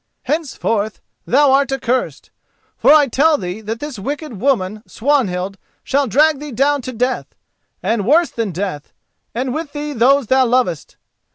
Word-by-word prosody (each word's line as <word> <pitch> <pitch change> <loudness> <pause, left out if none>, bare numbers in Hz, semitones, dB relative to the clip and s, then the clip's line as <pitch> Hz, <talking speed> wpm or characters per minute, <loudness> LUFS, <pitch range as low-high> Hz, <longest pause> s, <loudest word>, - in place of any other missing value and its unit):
Henceforth 230 -9 -2 0.3
thou 280 +2 +4
art 275 0 +3
accursed. 255 -1 -2 0.4
For - - +4
I 300 -1 +7
tell 295 +5 +3
thee 180 +1 -5
that 220 +2 -5
this 290 -6 -6
wicked 280 - -5
woman 215 -6 0
Swanhild 200 -8 -1 0.2
shall 280 0 +1
drag 295 +5 +3
thee 295 0 -7
down 280 +4 +1
to 255 - -6
death, 250 +2 -2 0.5
and 225 -2 0
worse 330 +5 +4
than 225 -4 -2
death, 175 -4 -5 0.4
and 250 +1 -2
with 310 -1 -5
thee 295 0 -4
those 270 +2 +3
thou 260 +2 +3
lovest. 235 - -1
260 Hz, 155 wpm, -18 LUFS, 220-285 Hz, 0.5 s, I